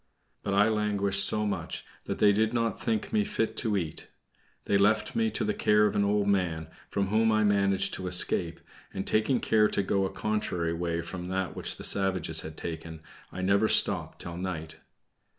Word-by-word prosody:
But 100 -1 -2
I 105 +2 +5
languished 100 -2 +1
so 105 +1 +2
much 95 -5 -4 0.2
that - - -3
they 105 - +5
did 110 +3 +1
not 115 -1 -1
think 115 - -2
me 215 -1 +3
fit 115 - -2
to 110 -4 +1
eat. 80 -5 -5 0.6
They 100 - 0
left 105 +2 +2
me 225 -1 +1
to - - -2
the 210 - 0
care 105 - +3
of - - 0
an 100 - +2
old 100 0 +1
man, 85 -6 0 0.2
from 100 -1 -1
whom 110 +2 +2
I 110 0 +2
managed 100 -2 +1
to 95 - -3
escape; 90 -2 +2 0.3
and 95 - -5
taking 110 +4 +1
care 110 -1 +3
to 100 - -1
go 95 0 0
a - - -2
contrary 90 -6 -2
way 85 0 -2
from 90 +1 -7
that 95 -1 -3
which - - -3
the - - -9
savages 90 -5 +1
had 80 0 -9
taken 80 -1 -7 0.3
I 95 - -6
never 100 +3 +3
stopped - - +3
till 85 0 -7
night. 85 -4 -5
100 Hz, 195 wpm, -28 LUFS, 90-110 Hz, 0.6 s, I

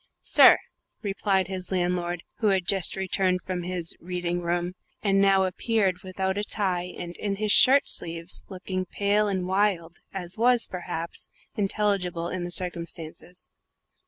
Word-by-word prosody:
"Sir?" - - +8 0.5
replied 195 -2 0
his 190 -1 -6
landlord, 175 -1 -1 0.2
who 220 - +1
had 190 -3 +2
just 190 -2 +2
returned 185 -1 0
from 185 -1 -3
his 175 -1 -1
"reading 175 0 -3
room," 175 +1 -1 0.3
and 195 -1 +3
now 195 -1 +4
appeared, 190 0 0
without 190 0 -2
a - - -1
tie 180 -4 -1
and 175 0 -7
in 200 -1 -2
his 210 +1 0
shirt 275 +5 +6
sleeves, 165 +1 -2
looking 185 -1 -4
pale 205 +2 +1
and 190 -3 -1
wild, 185 -3 0
as 190 +2 -2
was, 245 0 +5
perhaps, 175 -2 -4 0.3
intelligible 195 -4 0
in 185 -1 -4
the - - -5
circumstances. 175 -1 -5
185 Hz, 145 wpm, -26 LUFS, 175-195 Hz, 0.5 s, Sir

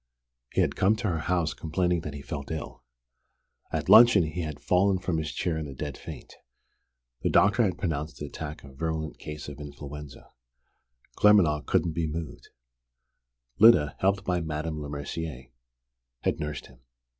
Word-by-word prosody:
He - - +2
had - - +1
come 100 +4 +3
to 110 -1 -2
her 80 -2 -1
house, 85 -1 0
complaining 90 +1 0
that 75 -2 -6
he 70 - -8
felt 70 -1 -6
ill. 80 -5 -6 0.9
At - - -2
luncheon 115 -5 +8
he 80 +3 -3
had 75 -3 -5
fallen 95 +1 +2
from 90 -3 -1
his 75 -1 -3
chair 80 -3 -2
in 75 - -4
a 70 - -9
dead 75 0 -5
faint. - - -10 0.8
The - - +1
doctor 105 +4 +4
had 95 -6 +1
pronounced 80 -3 -3
the 75 - -5
attack 75 +1 -7
a 70 -1 -13
virulent 80 +1 -3
case 75 -2 -7
of 75 0 -8
influenza. 75 -1 -9 0.9
Claremanagh 90 -8 +4
couldn't 80 0 +1
be 80 0 -1
moved. 80 0 -6 1.1
Lyda, 100 -11 +6
helped 100 +1 +1
by 90 -1 0
Madame 80 0 -3
Lemercier, 70 -2 -6 0.7
had - - 0
nursed 75 -2 -4
him. 60 -1 -18
80 Hz, 160 wpm, -27 LUFS, 75-90 Hz, 1.1 s, luncheon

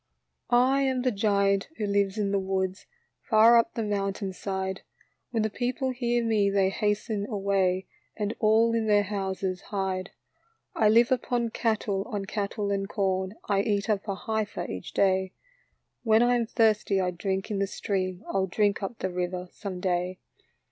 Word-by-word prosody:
" - - -51 0.2
I 275 - +2
am 260 -2 0
the 255 - +2
giant 200 -2 +1
who 210 - -1
lives 200 0 +1
in 200 -2 0
the 200 - +2
woods, 190 0 -2 0.4
Far 230 +1 +7
np - - -25
the 230 - -1
mountain 195 -2 -2
side. 190 0 -3 0.5
When 225 -3 0
the 220 - 0
people 255 +3 -1
hear 240 -1 0
me 215 -3 +2
they 195 -1 +2
hasten 210 0 -1
away, 195 -3 0 0.3
And 210 0 -1
all 225 +1 +4
in 225 -1 0
their 205 -1 +4
houses 190 -2 -3
hide. 190 -2 -2 0.3
" 455 0 -43
I 215 - +4
live 235 +3 +5
upon 240 -2 0
cattle, 215 -4 0
on 205 -5 -3
cattle 205 0 -2
and 195 0 -1
corn, 190 -1 -1
I 200 -1 +2
eat 205 0 0
up 205 0 -1
a 200 - -1
heifer 220 +1 -3
each 90 -1 -7
day. 190 -1 +2 0.7
When 225 0 +4
I 245 0 +3
am 235 -2 +1
thirsty 215 -4 +2
I 180 -1 0
drink 190 +3 -3
in 200 - -1
the 200 - +1
stream, 185 -2 -3
I - - -4
'11 190 -1 0
drink 205 +2 +1
up 200 +4 -4
the 190 - -3
river 180 0 -3
some 195 -3 -6
day." 180 0 -1
200 Hz, 180 wpm, -27 LUFS, 190-220 Hz, 0.7 s, Far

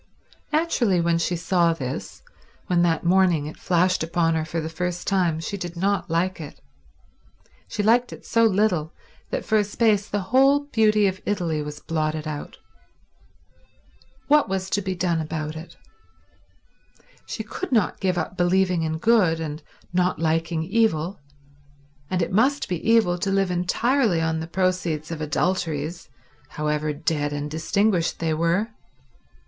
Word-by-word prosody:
Naturally 285 - +2
when 170 0 +2
she 175 +1 0
saw 170 0 +2
this, 130 -5 -6 0.4
when 175 -1 +2
that 165 -2 +1
morning 175 -4 +3
it 150 - -7
flashed 180 +1 +2
upon 165 0 +1
her 160 -1 0
for 165 +1 -3
the 160 - -3
first 180 +2 -4
time, 180 -5 +1
she 165 +5 -4
did 175 -2 -6
not 195 +1 0
like 170 +2 0
it; 150 - -9 1.1
she 210 - -3
liked 240 +3 +3
it - - -11
so 230 0 +2
little 190 -7 +1 0.3
that - - -3
for 215 -1 +3
a - - +3
space 205 0 +1
the 205 - -1
whole 275 +2 +5
beauty 215 -6 +3
of 190 0 -1
Italy 170 -7 -1
was 150 0 -6
blotted 155 -1 -2
out. 150 -1 -6 1.7
What 295 -4 +4
was 190 0 -2
to 205 - +1
be 190 -1 -3
done 175 -2 0
about 155 0 -4
it? 160 +2 -10 1.5
She - - -4
could 375 - -6
not 220 -7 +1
give 185 -2 0
up 180 - -3
believing 180 -1 +2
in 160 0 -1
good 185 -4 +3
and 155 -1 -5 0.3
not 180 -1 +1
liking 165 +1 0
evil, 190 -2 0 0.9
and 185 -2 0
it - - -3
must 260 +9 +2
be 175 -3 -3
evil 215 -6 +4
to 195 - -1
live 195 -1 +1
entirely 205 +3 +1
on 160 0 0
the 160 - -5
proceeds 170 -3 -1
of 160 -1 -5
adulteries, 160 0 -2 0.4
however 150 0 -1
dead 150 -1 -1
and 145 0 -4
distinguished 175 +3 +1
they 165 -1 -1
were. 170 +7 +1
175 Hz, 155 wpm, -24 LUFS, 160-200 Hz, 1.7 s, whole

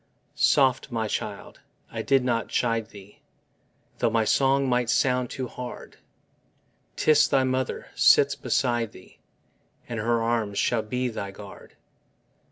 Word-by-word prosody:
Soft, 135 -1 +2
my 115 -2 -1
child: - - -5 0.3
I - - -4
did 135 -2 +2
not 115 -3 0
chide 115 -2 -1
thee, 100 -1 -15 0.8
Though - - +2
my 110 0 +1
song 135 +3 +2
might 125 -2 0
sound 125 -1 +1
too 130 -1 -5
hard; 125 0 -9 1.0
'Tis 155 -1 +4
thy 135 -2 +2
mother 130 0 -2
sits - - +5
beside 120 -2 -1
thee, 90 - -17 0.7
And 115 -2 -4
her 115 +1 0
arms 115 -3 -1
shall 120 +1 +1
be 125 +4 -2
thy 100 -3 -5
guard. 100 0 -13
120 Hz, 135 wpm, -25 LUFS, 110-130 Hz, 1.0 s, sits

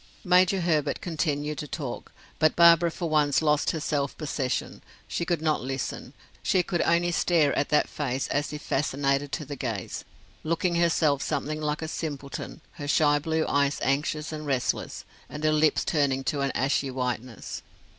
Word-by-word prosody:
Major 185 0 +4
Herbert 155 -4 +1
continued 150 -3 -2
to 150 - -5
talk, 135 -3 -6 0.3
but 155 -1 +4
Barbara 170 0 +7
for 170 +1 -4
once 150 -3 +3
lost 150 -2 +2
her 160 - -1
self 145 -2 -1
possession; 140 -4 -3 0.3
she 170 - -2
could 170 -3 -1
not 155 -1 +1
listen, 135 0 -4 0.3
she 185 - +2
could 175 -1 -1
only 170 +1 +2
stare 165 -4 +2
at 145 - 0
that 150 - +3
face 135 -3 -2
as 145 0 -1
if 150 -1 -7
fascinated 140 0 0
to 155 - -3
the 145 - -6
gaze, 115 -7 -4 0.4
looking 170 +2 0
herself 160 -4 +2
something 155 +1 -2
like 150 +1 -2
a - - -3
simpleton, 145 -1 -5
her 145 -3 -7
shy 145 0 +4
blue 160 +1 0
eyes 140 0 +2
anxious 150 +3 0
and 155 -1 -6
restless, 130 -3 -1 0.2
and 150 +1 -7
her 155 0 +3
lips 155 0 +3
turning 140 -4 +1
to 140 +1 -1
an 140 -1 0
ashy 135 +1 +1
whiteness. 125 -2 -4
150 Hz, 170 wpm, -27 LUFS, 140-160 Hz, 0.4 s, Barbara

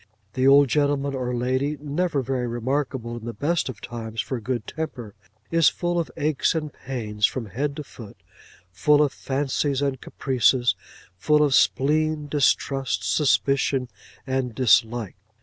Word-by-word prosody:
The 130 +1 +2
old 140 +1 +7
gentleman 140 0 +1
or 125 -2 -2
lady, 130 +5 -1
never 150 0 -1
very 125 -1 -2
remarkable 120 0 -2
in 115 - -9
the 120 -2 -5
best 150 +5 0
of 115 -5 -8
times 115 -1 -7
for 130 +1 -2
good 120 -1 -3
temper, 125 -9 -6 0.4
is 165 -2 +5
full 175 0 -2
of 165 - -2
aches 155 +1 +1
and 155 -2 -3
pains 110 -5 -1
from 130 -3 -5
head 140 +7 -3
to 150 - -5
foot; 115 -6 -12 0.5
full 150 +10 +4
of 145 - -1
fancies 140 0 -1
and 140 -2 -1
caprices; 125 -3 +2 0.5
full 150 +10 +3
of 145 -2 +2
spleen, 150 +3 +2
distrust, 135 -6 +1
suspicion, 135 -3 +1 0.4
and 130 -3 -2
dislike. 120 -3 +2
135 Hz, 150 wpm, -24 LUFS, 120-145 Hz, 0.5 s, old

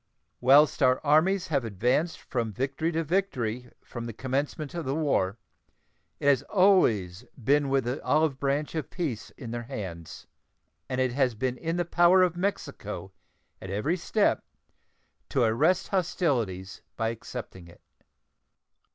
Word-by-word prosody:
Whilst 140 +5 +5
our 130 -1 +4
armies 170 +6 +3
have 140 -5 +1
advanced 125 - 0
from 115 -4 -3
victory 135 - -2
to 165 +1 0
victory 125 - -1
from 120 -1 -7
the 115 - -6
commencement 135 +5 -3
of 170 -1 -3
the 135 +1 -2
war, 120 -11 0 0.8
it - - -6
has 140 -3 +5
always 115 - +3
been 140 +3 +2
with 135 -1 +2
the 125 +3 -3
olive 150 -3 +2
branch 140 +2 -1
of 160 -2 -3
peace 145 - -4
in 120 -4 -7
their 120 0 -3
hands, 90 - -7 0.6
and 130 - -2
it 130 -1 +2
has 130 -3 +1
been 125 +3 -1
in 165 +5 -3
the 175 - 0
power 175 +2 +5
of 175 -2 +1
Mexico 140 - -4 0.5
at 95 - -8
every 105 - 0
step 200 +4 +1 0.9
to 130 - +2
arrest 145 +11 +2
hostilities 125 - -1
by 115 -1 0
accepting 115 -5 -8
it. 85 - -17
135 Hz, 145 wpm, -27 LUFS, 115-160 Hz, 0.9 s, Whilst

